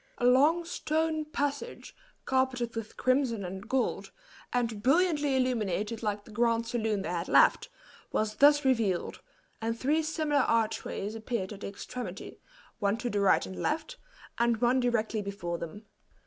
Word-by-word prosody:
A 245 - -1
long 295 +7 +4
stone 315 -2 -1
passage, 290 +8 -4 0.3
carpeted 260 -3 0
with 225 -1 -6
crimson 255 -6 +1
and 190 +4 -7
gold, 260 0 0 0.4
and 230 -4 -1
brilliantly 295 - +3
illuminated 220 -4 -1
like 210 -2 -2
the - - -13
grand 230 +1 +1
saloon 220 -4 -1
they - - -4
had 175 0 -2
left, - - +4 0.4
was 215 0 -1
thus 290 0 +6
revealed, 225 -9 +1 0.4
and 230 +1 -2
three 300 +5 +2
similar 310 -2 +1
archways 220 -3 -1
appeared 220 -3 -3
at 200 - -11
the - - -4
extremity, 240 +5 -7 0.4
one 205 +1 +1
to 240 0 -3
the 205 - 0
right 200 -1 +4
and 190 - -7
left, 325 +11 -2 0.4
and 235 -1 +3
one 245 +3 +3
directly 230 -3 0
before 175 -4 -4
them. 190 +6 -8
235 Hz, 150 wpm, -29 LUFS, 210-275 Hz, 0.4 s, thus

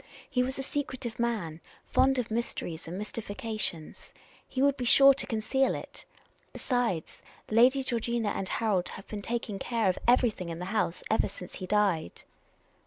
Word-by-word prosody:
He 250 - +1
was 260 +1 -1
a 270 - -3
secretive 260 -4 -4
man, 200 -10 -1 0.2
fond 265 0 +3
of 235 -3 -2
mysteries 215 -8 -3
and 175 +3 -5
mystifications. 210 -5 -5 0.4
He 260 - -4
would 280 +1 +4
be 260 - -4
sure 275 +3 +8
to 270 - -2
conceal 260 +4 +1
it. - - -8 0.5
Besides, 245 - -1 0.3
Lady 255 +5 +5
Georgina 235 -3 -1
and 195 -1 -3
Harold 205 -6 +1
have 195 - -9
been 210 -1 -5
taking 225 -2 -3
care 225 -1 +1
of 185 - -1
every 245 -1 +5
thing 180 -4 -7
in 165 - -4
the 180 - -5
house 195 -5 0
ever 220 - +3
since 180 -2 -10
he 185 - -6
died." 195 - +1
225 Hz, 170 wpm, -29 LUFS, 190-250 Hz, 0.5 s, sure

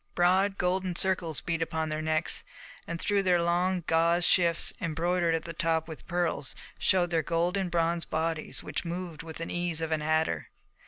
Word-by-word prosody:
Broad 190 +3 +3
golden 180 0 0
circles 180 -4 0
beat 165 -1 -2
upon 160 -1 -1
their 155 0 -2
necks, 155 +1 0 0.4
and 170 0 -4
through 205 +2 +2
their 180 -2 +3
long 175 +2 +1
gauze 170 +1 +3
shifts, 170 -2 +4
embroidered 170 +1 +1
at 160 - -2
the 170 - -5
top 160 -1 0
with 160 -2 -10
pearls, 175 -6 -1 0.2
showed 175 -2 +2
their 165 -1 +2
golden 175 +4 0
bronze 170 0 +1
bodies 160 0 -2
which - - -4
moved 170 -2 -5
with 165 -1 -9
the 165 - -5
ease 175 -2 -1
of 160 0 -2
an 155 -1 +1
adder. 155 +1 0
170 Hz, 175 wpm, -29 LUFS, 160-180 Hz, 0.4 s, shifts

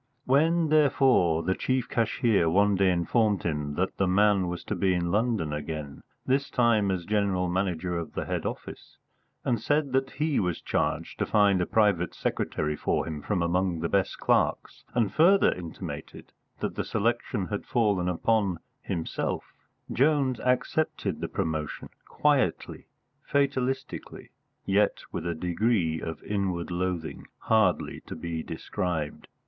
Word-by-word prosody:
When, 160 +5 +3
therefore, 130 - +4
the 95 +3 +1
chief 130 +4 -1
cashier 110 -6 +2
one 100 +4 +3
day 95 -1 +3
informed 100 +4 +1
him 75 -3 -2
that 95 +3 -1
the 95 - +2
man 100 0 +3
was 85 0 -4
to - - -3
be 95 0 +2
in 85 -1 -1
London 105 -8 0
again 75 -1 -5 0.2
this 135 +2 +1
time 115 -5 +3
as 90 -2 -2
General 100 -3 +1
Manager 90 -1 -1
of 85 - -7
the - - -3
head - - -2
office - - -7 0.5
and 120 -4 +1
said 145 +2 +1
that 135 +1 +1
he 150 -2 0
was 90 -4 -1
charged - - -2
to - - +1
find 100 -3 +4
a 90 - -1
private 100 -6 +2
secretary 75 0 -2
for - - -1
him 75 -2 -5
from 90 -1 -1
among 90 -1 0
the 85 - -1
best 100 -1 +1
clerks, - - 0
and 115 -5 +1
further 190 +5 +5
intimated 85 -3 -8 0.3
that - - -2
the - - -2
selection - - -1
had - - -3
fallen 100 -6 +1
upon 100 0 +1 0.2
himself, 80 - -3 0.4
Jones 135 -2 +2
accepted 125 - 0
the 85 - -2
promotion 80 -5 -3 0.2
quietly, 145 -3 0 0.3
fatalistically, 135 -2 -2 0.3
yet 100 +2 +2
with 85 - -4
a 85 - -1
degree 90 -1 0
of 80 -1 -6
inward 95 -4 -2
loathing 85 -2 -3
hardly 110 -5 +1
to - - -6
be 85 -2 -4
described. 80 -1 -4
95 Hz, 145 wpm, -27 LUFS, 85-120 Hz, 0.5 s, further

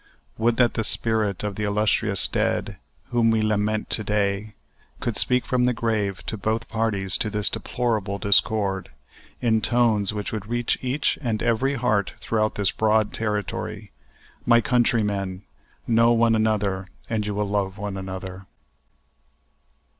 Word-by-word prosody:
Would 115 +1 +2
that 120 -2 +3
the 115 - -1
spirit 110 -3 0
of 105 -1 -2
the 105 - -2
illustrious 105 0 +2
dead, - - -1 0.3
whom 120 -2 +3
we 110 -1 +2
lament 110 0 0
to 105 - +2
day, 105 0 -1 0.4
could 120 - -2
speak 125 +4 +3
from 125 -1 +1
the 125 -1 +1
grave 110 -4 -1
to 110 - -3
both 110 +3 -2
parties 105 -4 0
to 105 - +1
this 105 -1 +1
deplorable 110 -5 -2
discord, 100 0 +2 0.5
in 110 -2 +2
tones 110 -3 +2
which 105 -1 -4
would 105 -2 -5
reach 120 +1 -1
each 130 +3 0
and 115 -5 -2
every 125 +4 +1
heart 110 -7 0
throughout 110 -1 -1
this 100 -2 +1
broad 110 -1 +1
territory: 105 -1 -3 0.5
My 120 -1 +5
countrymen! 105 -6 0 0.4
know 115 0 +4
one 115 0 +3
another 105 -4 0 0.2
and 110 -2 -1
you 105 - -3
will 105 0 -1
love 100 -1 -1
one 100 -1 -4
another. 95 0 -7
110 Hz, 145 wpm, -24 LUFS, 100-115 Hz, 0.5 s, My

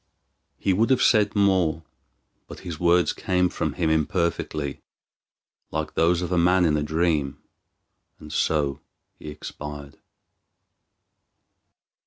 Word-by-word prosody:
He 95 - +1
would 110 +5 +2
have 130 -2 +3
said 105 -3 +3
more, 95 -6 +2 0.6
but - - -11
his 85 -4 -7
words 85 0 +3
came 90 -1 0
from - - -3
him 80 -3 0
imperfectly, 80 -2 -1 0.9
like 80 0 -4
those 85 +2 +2
of 90 - -4
a 90 - +2
man 90 +1 +4
in 75 -2 +2
a 75 - 0
dream, 75 -2 0 0.8
and 75 0 -10
so 75 -4 0 0.4
he 75 - -8
expired. 75 -1 -9
85 Hz, 120 wpm, -24 LUFS, 75-90 Hz, 0.9 s, man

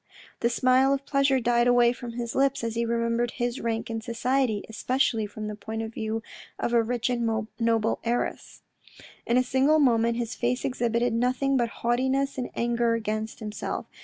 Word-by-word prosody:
The 235 - +2
smile 255 +2 +3
of 275 0 -7
pleasure 275 -2 +2
died 240 0 +2
away 245 -1 +5
from 245 -1 -8
his 235 -1 -4
lips 275 -2 +1
as 230 -1 -2
he 230 0 -1
remembered 235 +1 0
his 240 +1 -2
rank 225 -1 -2
in 225 -1 -4
society, 235 -1 0
especially 225 -1 0
from 215 +1 -6
the 210 - -4
point 220 +2 -5
of 220 0 -6
view 220 0 -3 0.3
of 240 - -2
a 235 - +5
rich 240 +1 -1
and 225 -3 -1
noble 230 -1 +1
heiress. 240 +1 -3 0.6
In 235 - +3
a 255 - +4
single 265 +4 +3
moment 235 -5 +3
his 240 0 -3
face 250 +3 -1
exhibited 240 -2 0
nothing 255 +3 +1
but 240 -3 +1 0.2
haughtiness 265 +3 +1
and 250 - -3
anger 235 0 +1
against 215 0 -3
himself. 210 -1 -4
235 Hz, 180 wpm, -26 LUFS, 225-255 Hz, 0.6 s, away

